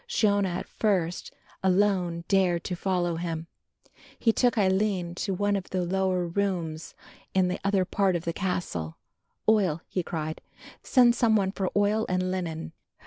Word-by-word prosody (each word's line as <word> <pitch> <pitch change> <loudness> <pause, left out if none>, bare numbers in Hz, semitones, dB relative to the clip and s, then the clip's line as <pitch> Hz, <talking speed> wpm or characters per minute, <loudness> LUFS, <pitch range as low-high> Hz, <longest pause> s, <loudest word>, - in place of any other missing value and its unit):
Shiona, 205 - +2
at 175 +1 -4
first, 180 -6 -1 0.3
alone 185 -3 +2
dared 180 -4 +2
to 180 - -3
follow 175 -2 0
him. 165 -1 -3 0.7
He 225 - +2
took 245 -1 +2
Aline 190 -3 +1
to 195 - -2
one 205 +2 +1
of 195 -2 -4
the 185 -1 -1
lower 185 0 0
rooms 170 -4 -2 0.4
in 185 -1 +3
the 180 - -2
other 195 -1 +2
part 195 -1 +1
of 170 - -3
the 170 - -1
castle. 165 - -3 0.5
"Oil," 190 -8 +3
he 185 - -1
cried, 155 -2 -4 0.4
"send 245 -3 +5
some 230 -2 +3
one 195 -2 +2
for 190 -2 -2
oil 205 +2 +2
and 185 0 0
linen." 165 -4 -4
185 Hz, 155 wpm, -27 LUFS, 175-200 Hz, 0.7 s, send